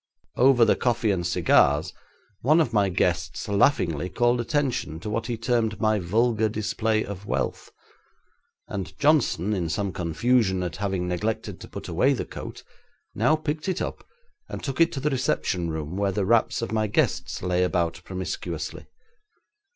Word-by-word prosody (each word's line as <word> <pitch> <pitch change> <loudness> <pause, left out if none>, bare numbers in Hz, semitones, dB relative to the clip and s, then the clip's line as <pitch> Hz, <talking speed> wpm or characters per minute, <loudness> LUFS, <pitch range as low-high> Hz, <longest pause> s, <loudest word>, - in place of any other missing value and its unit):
'Over 125 -2 +5
the - - +4
coffee 120 -3 +1
and 90 -3 -1
cigars 85 - +3 0.5
one 155 +7 +4
of 130 -8 +1
my 100 -3 +3
guests 90 - -1
laughingly 90 - +2
called 120 +5 +2
attention 125 - -1
to 105 +4 -5
what 115 +2 -2
he 120 -2 -2
termed 115 -2 0
my 110 -2 +2
vulgar 110 +4 +1
display 110 +1 -1
of 100 0 -8
wealth, - - -2 1.0
and 95 -2 -6
Johnson, 135 - +2
in 90 -5 -1
some 100 +3 -1
confusion 95 +3 +1
at 90 -1 -4
having 95 -2 -2
neglected 105 +5 -3
to - - -9
put - - -8
away 110 +12 +2
the 130 - -3
coat, - - -8 0.5
now 120 +9 +3
picked 155 +2 -3
it 185 - -1
up, - - -4 0.5
and - - -6
took 135 +2 -2
it 165 - +5
to 135 - -3
the 150 +2 0
reception 95 -9 0
room 80 +1 -4
where 100 0 0
the 95 0 -1
wraps 115 +2 +2
of 115 - -4
my 110 -1 +1
guests 100 - 0
lay 90 0 +1
about 85 -1 0
promiscuously. 95 0 -5
105 Hz, 165 wpm, -25 LUFS, 90-120 Hz, 1.0 s, Over